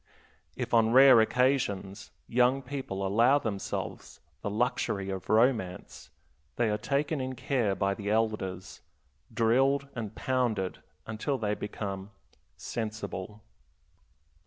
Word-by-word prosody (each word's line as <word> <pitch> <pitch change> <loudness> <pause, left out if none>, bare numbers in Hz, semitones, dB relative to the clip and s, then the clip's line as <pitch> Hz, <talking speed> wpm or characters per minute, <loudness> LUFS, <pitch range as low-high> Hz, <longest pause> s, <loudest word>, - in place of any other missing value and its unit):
If, - - -4
on 115 0 +4
rare 130 -2 +8
occasions, 110 -5 0 0.2
young 125 +3 +2
people 130 -10 -4
allow 115 +8 +4
themselves 105 -8 -5 0.2
the - - -3
luxury 100 -3 -1
of 95 -1 -6
romance, 110 -5 +1 0.5
they 115 -3 +1
are 105 - 0
taken 140 +4 -1
in 130 0 -4
care 120 -5 0
by 100 0 0
the 100 0 -5
elders, 105 -4 -2 0.5
drilled 135 +5 +2
and 110 -3 -6
pounded 120 -8 -1 0.3
until 110 +6 -2
they 105 -3 -1
become 100 -2 -5 0.5
"sensible." 105 -2 -5
110 Hz, 110 wpm, -29 LUFS, 100-130 Hz, 0.5 s, rare